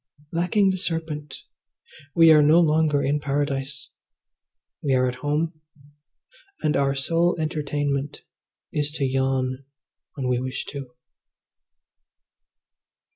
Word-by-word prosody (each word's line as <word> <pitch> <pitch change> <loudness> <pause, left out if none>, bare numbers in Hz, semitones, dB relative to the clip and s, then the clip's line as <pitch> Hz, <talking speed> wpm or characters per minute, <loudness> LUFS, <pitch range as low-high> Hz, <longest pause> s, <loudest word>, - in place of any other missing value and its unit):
Lacking 180 +4 +2
the 185 - -2
serpent 160 -5 -3 0.8
we 165 -1 +7
are 155 -1 +7
no 155 +3 +6
longer 155 -3 +3
in 145 +2 +1
Paradise, 140 -1 -3 0.9
we 135 -2 +1
are 130 0 +3
at 125 - -1
home, 155 +2 -1 1.0
and 150 0 +2
our 140 0 +1
sole 165 +5 +1
entertainment 145 -3 -2 0.5
is 145 -1 0
to 145 -3 -1
yawn 130 0 0 0.5
when 135 -4 -3
we 125 -1 +1
wish 130 +1 -4
to. 135 -4 -8
145 Hz, 110 wpm, -24 LUFS, 135-160 Hz, 1.0 s, we